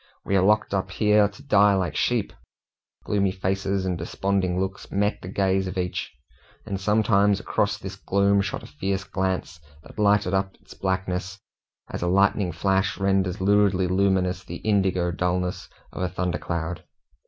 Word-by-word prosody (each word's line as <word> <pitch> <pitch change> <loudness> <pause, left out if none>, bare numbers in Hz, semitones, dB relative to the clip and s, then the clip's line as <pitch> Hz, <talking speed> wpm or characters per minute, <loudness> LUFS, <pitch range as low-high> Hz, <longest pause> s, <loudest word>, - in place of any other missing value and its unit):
"We 100 - 0
are 95 - +4
locked 105 +2 +2
up 95 -1 -1
here 105 +1 +3
to 105 +7 -14
die 105 -7 +4
like 90 -6 -1
sheep." 120 +2 0 0.7
Gloomy 100 -2 +1
faces 95 +1 -1
and 90 -2 -2
desponding 95 +1 -1
looks 95 0 -4
met 105 +2 0
the - - -8
gaze 95 0 0
of 95 - -5
each, 90 -1 -3 0.5
and 100 -3 -4
sometimes 105 -1 +3
across 105 -1 0
this 95 -2 -7
gloom 100 +1 +2
shot 95 -2 -4
a - - -9
fierce 95 +5 -3
glance 95 -3 -3 0.2
that 80 - -13
lighted 105 -2 +3
up 95 0 0
its - - -16
blackness, 95 0 -2 0.5
as - - -6
a 90 - 0
lightning 100 0 +2
flash 95 +1 0
renders 95 -2 +1
luridly 100 -1 +3
luminous 95 -1 +1
the - - -8
indigo 95 -4 +2
dullness 90 +1 -2 0.2
of - - -6
a 90 - 0
thunder 90 -1 -2
cloud. 85 0 -4
95 Hz, 165 wpm, -25 LUFS, 90-100 Hz, 0.7 s, are